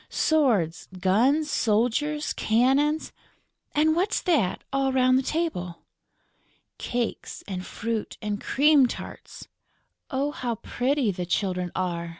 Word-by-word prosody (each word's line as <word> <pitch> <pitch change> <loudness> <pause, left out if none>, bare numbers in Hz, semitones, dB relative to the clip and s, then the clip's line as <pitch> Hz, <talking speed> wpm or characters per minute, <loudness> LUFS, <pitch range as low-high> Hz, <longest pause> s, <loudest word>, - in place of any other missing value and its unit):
"Swords, 235 - +1
guns, 260 - +2
soldiers, 250 +8 +1
cannons...." 270 +7 +2 0.6
"And 315 +1 +3
what's 380 +5 +1
that, 290 - +1
all 270 -1 +1
round 255 -1 +3
the 260 - +3
table?" 265 - -3 1.0
"Cakes 240 -2 -3
and 185 -2 -4
fruit 225 +2 -4
and 210 -1 -3
cream 285 -1 +4
tarts." - - -9 0.6
"Oh, 280 +2 -1
how 240 -5 -3
pretty 250 +1 0
the 180 -1 -5
children 180 -1 -1
are!" 170 -2 -2
250 Hz, 115 wpm, -26 LUFS, 200-295 Hz, 1.0 s, cream